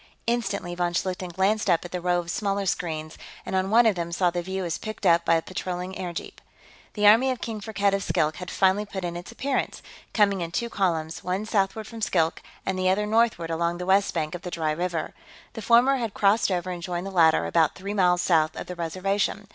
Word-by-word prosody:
Instantly, 225 Hz, -7 st, -1 dB
von 175 Hz, 0 st, -1 dB
Schlichten 185 Hz, 0 st, -2 dB
glanced 200 Hz, +4 st, +1 dB
up 170 Hz, 0 st, +2 dB
at 175 Hz, -, -8 dB
the 180 Hz, -, -3 dB
row 180 Hz, 0 st, +1 dB
of 175 Hz, 0 st, -3 dB
smaller 200 Hz, 0 st, -1 dB
screens, 160 Hz, -3 st, -3 dB, 0.3 s
and -, -, -3 dB
on 190 Hz, 0 st, +1 dB
one 235 Hz, +3 st, +5 dB
of 220 Hz, -, +5 dB
them 170 Hz, -2 st, -4 dB
saw 175 Hz, 0 st, +2 dB
the 175 Hz, 0 st, -2 dB
view 190 Hz, +1 st, -4 dB
as 170 Hz, -, -3 dB
picked 215 Hz, 0 st, -6 dB
up 170 Hz, 0 st, +5 dB
by 165 Hz, -, +3 dB
a 165 Hz, -, 0 dB
patrolling 185 Hz, 0 st, -4 dB
airjeep. 175 Hz, -3 st, -6 dB, 0.5 s
The 210 Hz, -1 st, 0 dB
army 225 Hz, +6 st, +7 dB
of 255 Hz, -2 st, -2 dB
King 220 Hz, -2 st, -5 dB
Firkked 200 Hz, -2 st, 0 dB
of 195 Hz, -, 0 dB
Skilk 160 Hz, -3 st, 0 dB
had 180 Hz, 0 st, -7 dB
finally 190 Hz, +2 st, +2 dB
put 190 Hz, -3 st, -5 dB
in 170 Hz, 0 st, -4 dB
its 175 Hz, +6 st, -7 dB
appearance, 265 Hz, +3 st, -2 dB, 0.3 s
coming 200 Hz, -3 st, +2 dB
in 170 Hz, -, -3 dB
two 235 Hz, +7 st, -3 dB
columns, 165 Hz, -5 st, -1 dB
one 185 Hz, +4 st, -2 dB
southward 215 Hz, 0 st, 0 dB
from 225 Hz, +1 st, -9 dB
Skilk 165 Hz, -5 st, +1 dB, 0.2 s
and 190 Hz, -1 st, -1 dB
the 185 Hz, 0 st, +2 dB
other 205 Hz, +3 st, +1 dB
northward 215 Hz, -6 st, +1 dB
along 170 Hz, +1 st, 0 dB
the 180 Hz, -, -5 dB
west 195 Hz, +2 st, +3 dB
bank 155 Hz, -2 st, -1 dB
of 175 Hz, -, -6 dB
the 180 Hz, -, -6 dB
dry 160 Hz, -3 st, -1 dB
river. 170 Hz, 0 st, -2 dB, 0.4 s
The 225 Hz, -, -6 dB
former 240 Hz, +5 st, +4 dB
had 230 Hz, -5 st, -4 dB
crossed 205 Hz, +2 st, +3 dB
over 185 Hz, -1 st, -1 dB
and 175 Hz, -1 st, -6 dB
joined 175 Hz, +1 st, -4 dB
the 195 Hz, -, -5 dB
latter, 165 Hz, -4 st, +4 dB
about 160 Hz, -3 st, +2 dB
three 200 Hz, +2 st, -5 dB
miles 180 Hz, -3 st, +3 dB
south 160 Hz, -3 st, +2 dB
of -, -, -6 dB
the 180 Hz, -, -7 dB
Reservation. 195 Hz, +4 st, -2 dB
185 Hz, 230 wpm, -25 LUFS, 170-205 Hz, 0.5 s, army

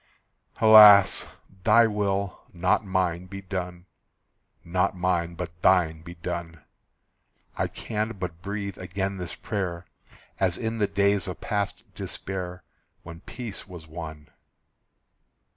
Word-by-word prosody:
Alas! 105 Hz, -3 st, +8 dB, 0.4 s
"Thy 115 Hz, +1 st, +6 dB
will, 100 Hz, -2 st, -1 dB
not 90 Hz, +4 st, +1 dB
mine, 90 Hz, -2 st, -1 dB
be 100 Hz, +1 st, -7 dB
done." 90 Hz, -2 st, -5 dB, 0.8 s
Not 90 Hz, +2 st, 0 dB
mine, 85 Hz, -1 st, 0 dB
but 85 Hz, -1 st, -7 dB
Thine, 80 Hz, -4 st, +3 dB
be 85 Hz, +1 st, -10 dB
done. 85 Hz, -2 st, -6 dB, 0.9 s
I -, -, 0 dB
can 110 Hz, +1 st, -4 dB
but 90 Hz, -3 st, -6 dB
breathe 100 Hz, 0 st, -5 dB
again 95 Hz, +2 st, -3 dB
this 90 Hz, -2 st, -6 dB
prayer, 90 Hz, -5 st, -4 dB, 0.5 s
As 95 Hz, -3 st, +1 dB
in 115 Hz, -1 st, -3 dB
the 105 Hz, -, +2 dB
days 100 Hz, -1 st, +1 dB
of 90 Hz, -, -6 dB
past 100 Hz, -2 st, -2 dB
despair, 90 Hz, -2 st, -5 dB, 0.4 s
When 85 Hz, 0 st, -10 dB
peace 115 Hz, +1 st, -7 dB
was 90 Hz, -4 st, -10 dB
won. 80 Hz, -2 st, -9 dB
90 Hz, 120 wpm, -26 LUFS, 85-100 Hz, 0.9 s, Alas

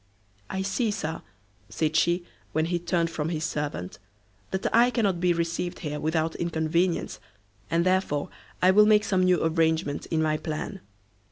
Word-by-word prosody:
"I 190 Hz, 0 st, -2 dB
see, 215 Hz, +4 st, 0 dB
Sir," 165 Hz, -6 st, -3 dB, 0.5 s
said 155 Hz, -1 st, -1 dB
she, 175 Hz, +2 st, +2 dB, 0.3 s
when 155 Hz, 0 st, +1 dB
he 175 Hz, +1 st, -1 dB
turned 170 Hz, -1 st, 0 dB
from 155 Hz, -1 st, -2 dB
his 160 Hz, -2 st, -2 dB
servant, 145 Hz, -, -3 dB, 0.5 s
"that 190 Hz, 0 st, -3 dB
I 240 Hz, +2 st, +6 dB
cannot 205 Hz, -8 st, 0 dB
be 180 Hz, 0 st, +3 dB
received 170 Hz, +1 st, -2 dB
here 150 Hz, -2 st, -3 dB
without 160 Hz, +1 st, 0 dB
inconvenience, 170 Hz, +1 st, 0 dB, 0.5 s
and 170 Hz, +2 st, +1 dB
therefore 185 Hz, -6 st, +1 dB, 0.3 s
I 185 Hz, -, +7 dB
will 210 Hz, +2 st, +6 dB
make 210 Hz, -1 st, +5 dB
some 190 Hz, -3 st, +1 dB
new 185 Hz, -1 st, +3 dB
arrangement 160 Hz, -2 st, +1 dB
in 160 Hz, -, 0 dB
my 155 Hz, -1 st, +1 dB
plan." 165 Hz, +5 st, -5 dB
170 Hz, 160 wpm, -26 LUFS, 160-185 Hz, 0.5 s, I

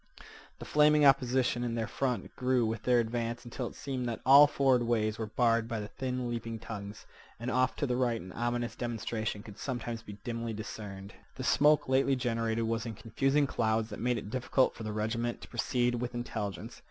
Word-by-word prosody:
The -, -, -9 dB
flaming 150 Hz, 0 st, +5 dB
opposition 125 Hz, -2 st, +3 dB
in 120 Hz, -1 st, -2 dB
their 115 Hz, -1 st, -1 dB
front 125 Hz, +1 st, -2 dB
grew 125 Hz, -2 st, +2 dB
with 110 Hz, 0 st, -2 dB
their 125 Hz, -1 st, +3 dB
advance 115 Hz, +1 st, -2 dB
until 120 Hz, +1 st, -4 dB
it -, -, -10 dB
seemed 130 Hz, -3 st, -3 dB
that 115 Hz, -, -4 dB
all 140 Hz, +2 st, +9 dB
forward 135 Hz, -3 st, +3 dB
ways 110 Hz, -2 st, 0 dB
were 110 Hz, -, -2 dB
barred 115 Hz, 0 st, +2 dB
by 115 Hz, -2 st, -3 dB
the 105 Hz, 0 st, -6 dB
thin 125 Hz, -1 st, -3 dB
leaping 115 Hz, -1 st, -4 dB
tongues, 105 Hz, -2 st, -8 dB, 0.3 s
and 120 Hz, +2 st, -3 dB
off 130 Hz, +1 st, +2 dB
to -, -, -1 dB
the 125 Hz, -2 st, 0 dB
right 120 Hz, -2 st, +1 dB
an 90 Hz, -1 st, -9 dB
ominous 120 Hz, +1 st, -2 dB
demonstration 115 Hz, -3 st, -3 dB
could 105 Hz, -2 st, -12 dB
sometimes 120 Hz, -3 st, -4 dB
be 105 Hz, -, -9 dB
dimly 115 Hz, -1 st, -3 dB
discerned. 105 Hz, -2 st, -7 dB, 0.2 s
The 130 Hz, -, -5 dB
smoke 150 Hz, +2 st, +4 dB
lately 135 Hz, +1 st, +3 dB
generated 115 Hz, -2 st, -1 dB
was 115 Hz, +1 st, -1 dB
in 115 Hz, -, -5 dB
confusing 135 Hz, +7 st, +1 dB
clouds 110 Hz, -3 st, 0 dB
that 105 Hz, -, -6 dB
made 125 Hz, 0 st, +1 dB
it 105 Hz, -1 st, -6 dB
difficult 130 Hz, +1 st, +2 dB
for -, -, -11 dB
the 110 Hz, -1 st, -3 dB
regiment 115 Hz, +3 st, -2 dB
to -, -, -10 dB
proceed 125 Hz, -1 st, 0 dB
with 120 Hz, 0 st, -3 dB
intelligence. 110 Hz, -4 st, -5 dB
120 Hz, 200 wpm, -31 LUFS, 110-125 Hz, 0.3 s, all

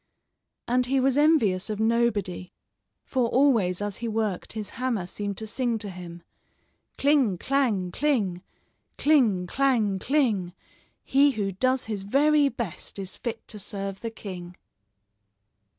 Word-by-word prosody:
And 250 Hz, +1 st, +2 dB
he 270 Hz, +1 st, +2 dB
was 265 Hz, 0 st, +2 dB
envious 255 Hz, -, +3 dB
of 210 Hz, -1 st, -3 dB
nobody, 220 Hz, -5 st, 0 dB, 0.5 s
for 255 Hz, -3 st, +1 dB
always 225 Hz, -9 st, +3 dB
as 205 Hz, -1 st, -3 dB
he 235 Hz, -, -4 dB
worked 215 Hz, -4 st, -2 dB
his 210 Hz, -2 st, -5 dB
hammer 235 Hz, -8 st, 0 dB
seemed 200 Hz, +1 st, -5 dB
to 220 Hz, -, -5 dB
sing 235 Hz, +1 st, -1 dB
to 205 Hz, -2 st, -5 dB
him: 175 Hz, -1 st, -9 dB, 0.7 s
"Cling, 275 Hz, -9 st, +3 dB
clang, 225 Hz, -8 st, 0 dB
cling! 210 Hz, -10 st, 0 dB, 0.6 s
Cling, 235 Hz, -12 st, +3 dB
clang, 220 Hz, -3 st, +1 dB
cling! 220 Hz, -10 st, +1 dB, 0.5 s
He 280 Hz, +1 st, +4 dB
who 200 Hz, -3 st, -2 dB
does 255 Hz, +7 st, 0 dB
his 215 Hz, -3 st, -3 dB
very 285 Hz, +7 st, +3 dB
best, 230 Hz, -, -6 dB
Is 190 Hz, -1 st, -6 dB
fit 230 Hz, -2 st, -6 dB
to 210 Hz, -, -7 dB
serve 195 Hz, -1 st, -5 dB
the 230 Hz, -, -3 dB
king." 180 Hz, -5 st, -8 dB
220 Hz, 135 wpm, -26 LUFS, 195-260 Hz, 0.7 s, He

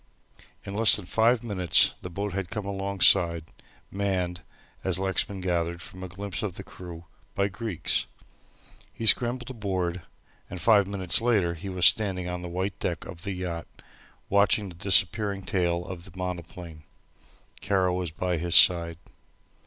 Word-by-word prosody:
In 100 Hz, -, -6 dB
less 110 Hz, +2 st, +7 dB
than 105 Hz, -, -6 dB
five 115 Hz, +4 st, +2 dB
minutes 95 Hz, -6 st, +3 dB
the 90 Hz, -, -7 dB
boat 100 Hz, +2 st, -4 dB
had 95 Hz, -2 st, -4 dB
come 105 Hz, -3 st, -5 dB
alongside, 95 Hz, -4 st, +2 dB, 0.5 s
manned, 95 Hz, -3 st, -2 dB, 0.4 s
as 95 Hz, -2 st, +1 dB
Lexman 95 Hz, 0 st, -1 dB
gathered 85 Hz, -1 st, -2 dB
from 95 Hz, +2 st, -10 dB
a -, -, -5 dB
glimpse 95 Hz, 0 st, -6 dB
of 100 Hz, -5 st, -4 dB
the -, -, -8 dB
crew, 85 Hz, -2 st, -11 dB, 0.3 s
by 100 Hz, 0 st, 0 dB
Greeks. 105 Hz, -3 st, -1 dB, 0.8 s
He 115 Hz, -, -7 dB
scrambled 120 Hz, +3 st, +2 dB
aboard 95 Hz, -6 st, -3 dB, 0.5 s
and 90 Hz, -, -7 dB
five 100 Hz, +2 st, +4 dB
minutes 95 Hz, -1 st, +3 dB
later 105 Hz, -8 st, +1 dB
he 85 Hz, +4 st, -8 dB
was 90 Hz, -2 st, +1 dB
standing 95 Hz, -4 st, +3 dB
on 90 Hz, 0 st, -5 dB
the 90 Hz, -, -7 dB
white 90 Hz, +1 st, -4 dB
deck -, -, -3 dB
of 85 Hz, -, -10 dB
the 100 Hz, 0 st, -4 dB
yacht, 90 Hz, -2 st, -5 dB, 0.6 s
watching 100 Hz, 0 st, +2 dB
the 85 Hz, -, -12 dB
disappearing 100 Hz, +2 st, +2 dB
tail 90 Hz, -2 st, -1 dB
of 90 Hz, -2 st, -8 dB
the 95 Hz, -, -15 dB
monoplane. 90 Hz, -3 st, -7 dB, 0.8 s
Kara 95 Hz, -3 st, +1 dB
was 90 Hz, -1 st, -2 dB
by 90 Hz, +2 st, -2 dB
his 85 Hz, 0 st, 0 dB
side. 85 Hz, -2 st, +6 dB
95 Hz, 155 wpm, -26 LUFS, 85-100 Hz, 0.8 s, less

